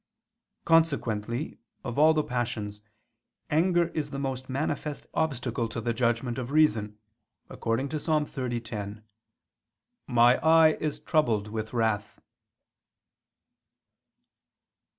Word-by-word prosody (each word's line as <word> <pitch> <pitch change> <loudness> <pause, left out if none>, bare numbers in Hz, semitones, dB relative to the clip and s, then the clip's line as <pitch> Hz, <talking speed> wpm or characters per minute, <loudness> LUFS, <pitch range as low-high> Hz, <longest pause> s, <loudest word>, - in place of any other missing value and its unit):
Consequently, 130 -6 +1 0.2
of 120 +3 -3
all 160 +1 +6
the 155 - +2
passions, 110 -5 -3 0.7
anger 170 +2 +3
is 150 -3 -3
the 140 - -6
most 135 -1 -4
manifest 145 +2 -3
obstacle 125 -6 -1
to 115 - -5
the 115 +1 -1
judgment 120 +1 0
of 125 -1 -5
reason, 110 -9 +2 0.5
according 115 +5 -1
to 155 - -2
Ps. 150 - -7
30:10: 120 -8 -2 1.0
"My 120 0 +5
eye 160 0 +6
is 155 -2 -2
troubled 115 - +1
with 110 0 -4
wrath." 110 -3 -1
125 Hz, 105 wpm, -28 LUFS, 115-150 Hz, 1.0 s, all